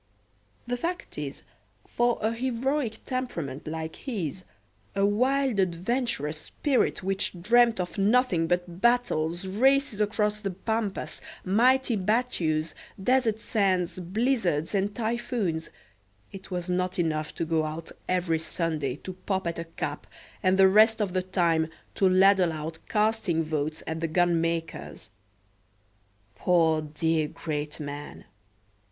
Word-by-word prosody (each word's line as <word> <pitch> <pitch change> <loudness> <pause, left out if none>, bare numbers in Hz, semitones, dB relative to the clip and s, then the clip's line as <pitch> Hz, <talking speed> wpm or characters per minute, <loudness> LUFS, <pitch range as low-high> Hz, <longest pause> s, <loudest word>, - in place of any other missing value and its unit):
The 245 0 -2
fact 345 +7 -4
is, 140 -2 -6 0.4
for 240 0 +1
a 220 - +2
heroic 255 0 -1
temperament 170 - -4
like 160 0 -4
his, 190 - -4 0.5
a 195 - +3
wild 255 +2 +2
adventurous 180 - -1
spirit 275 -9 0
which 190 -1 -1
dreamt 230 +3 +4
of 180 +3 -3
nothing 200 -5 +3
but 175 +1 -2
battles, 190 -8 +2
races 250 +3 +2
across 210 0 0
the 200 - -2
pampas, 210 +2 -3 0.2
mighty 245 +5 +3
battues, 185 -7 0 0.3
desert 230 0 +2
sands, 190 -6 0
blizzards 185 - 0
and 200 +1 0
typhoons, 225 -7 -2 0.6
it 195 -1 -10
was 180 -2 -3
not 185 0 -1
enough 155 -3 -1
to 165 - -2
go 160 -1 +1
out 155 +2 -6 0.2
every 175 -3 +1
Sunday 155 -5 -2
to 185 +5 -8
pop 190 -2 0
at 170 0 -2
a 165 - -4
cap, 150 -3 -5 0.3
and 185 0 +3
the 190 0 +7
rest 220 +3 +5
of 200 -4 -1
the 185 - +1
time 170 -4 +1 0.3
to 190 - +3
ladle 185 -1 +5
out 160 +1 -5
casting 210 -6 +1
votes 155 0 -2
at 160 0 -3
the 165 - -1
gunmaker's. 165 - -1 1.2
Poor 165 - +3
dear 155 +1 0
great 150 0 -4
man! 145 0 -7
185 Hz, 130 wpm, -27 LUFS, 165-225 Hz, 1.2 s, the